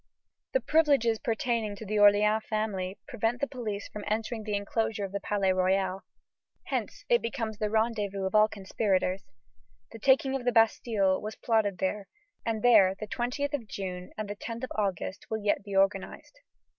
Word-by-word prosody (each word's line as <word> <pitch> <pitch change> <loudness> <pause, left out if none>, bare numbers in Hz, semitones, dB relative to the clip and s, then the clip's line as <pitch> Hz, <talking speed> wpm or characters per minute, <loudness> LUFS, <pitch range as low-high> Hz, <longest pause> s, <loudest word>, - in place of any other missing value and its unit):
The - - +2
privileges 280 -8 +3
pertaining 225 -2 -1
to 220 - -9
the 210 +1 -1
Orleans 210 +1 +5
family 205 -3 -2
prevent 240 -2 -1
the 280 - +1
police 225 -7 -5
from 210 - -8
entering 220 +1 -2
the 210 -1 -1
enclosure 205 +1 -1
of 190 - -8
the 200 - -2
Palais 195 -2 +1
Royal. 190 +1 +1 0.6
Hence - - -4
it 480 -1 +4
becomes 225 -3 -4
the 210 - 0
rendezvous 210 -3 0
of 190 - -2
all 215 0 +6
conspirators. 195 -2 -1 0.7
The 225 - -10
taking 265 +2 +3
of 265 - -3
the 245 - +2
Bastille 220 -4 +2
was 215 +1 -5
plotted 215 -5 +1
there, 195 +3 -2 0.4
and 225 -1 -2
there 205 -6 +6
the 215 - -5
20th 255 +6 -2
of 250 -7 -3
June 180 -3 -6
and 215 -1 -3
the 205 - -5
10th 230 +3 -6
of 255 - -4
August 195 -2 -3
will 220 -1 -3
yet 205 0 +1
be 200 -1 -6
organized. 195 - 0
215 Hz, 175 wpm, -29 LUFS, 200-230 Hz, 0.7 s, all